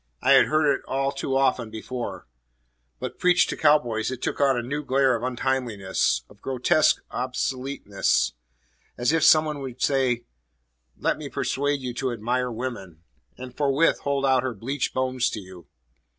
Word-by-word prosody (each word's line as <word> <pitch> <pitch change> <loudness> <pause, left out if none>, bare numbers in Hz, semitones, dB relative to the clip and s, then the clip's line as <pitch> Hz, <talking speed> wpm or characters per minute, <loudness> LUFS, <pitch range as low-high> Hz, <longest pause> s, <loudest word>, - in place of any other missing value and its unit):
I 135 - +2
had 135 -1 +7
heard 155 0 +2
it - - -4
all 135 +1 -1 0.2
often 130 -4 +1
before; 110 - -6 0.7
but - - -6
preached 180 0 +3
to - - -3
cow 150 -1 +5
boys 115 -6 -3
it 130 -2 -5
took - - -3
on 135 -2 +3
a 120 - -2
new 145 +5 -3
glare 135 -2 +2
of 115 - -4
untimeliness, 120 - -1
of 105 - -20
grotesque 135 +4 +2
obsoleteness 125 - -1 0.6
as 120 +3 +1
if 165 -2 +2
some 155 0 +6
one 150 -1 -3
should 130 -1 -6
say, 130 -4 +1 0.7
"Let - - 0
me - - -6
persuade 145 0 -1
you 125 -1 -4
to 130 +1 -2
admire 125 +3 -1
woman," 110 -9 -6 0.3
and 125 -1 -9
forthwith 145 +2 +2
hold 140 -1 -1
out 130 -1 +3
her 130 -2 -3
bleached 130 +7 -3
bones 130 -1 0
to 110 - -5
you. 90 -4 -13
130 Hz, 165 wpm, -25 LUFS, 115-135 Hz, 0.7 s, had